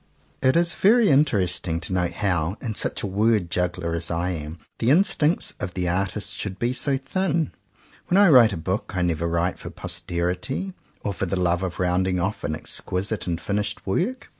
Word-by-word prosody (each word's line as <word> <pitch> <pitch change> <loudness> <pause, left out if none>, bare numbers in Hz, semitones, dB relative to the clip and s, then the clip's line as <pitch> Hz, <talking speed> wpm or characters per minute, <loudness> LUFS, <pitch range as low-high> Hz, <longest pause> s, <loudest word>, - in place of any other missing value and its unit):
It 130 0 +3
is 170 0 +3
very 225 +2 +4
interesting 95 - +2
to 85 +3 -5
note 90 -1 0
how, 90 -1 -1
in 115 -3 -4
such - - -1
a - - 0
word 100 -2 +1
juggler 90 -2 -1
as 85 0 -1
I 85 +2 -1
am, 80 -1 -6 0.2
the 115 - +1
instincts 160 0 +3
of 90 0 -5
the 90 -1 -1
artist 100 +3 0
should 100 -2 -4
be 120 +2 0
so 135 +2 +3
thin. 165 +3 -1 0.6
When 180 - +2
I 200 -2 +7
write 125 -7 +7
a 95 - -4
book, 90 +5 -3
I 90 - +1
never 85 -1 0
write 85 +2 -1
for - - -7
posterity, 90 - -3 0.3
or 100 - -2
for 95 - -3
the 95 +1 -1
love 90 0 +1
of 90 -2 -4
rounding 90 0 +1
off 95 +4 -2
an 75 +1 -1
exquisite 95 +5 -2
and 85 -2 -1
finished 105 +5 -3
work. 195 - -2
95 Hz, 190 wpm, -24 LUFS, 85-120 Hz, 0.6 s, I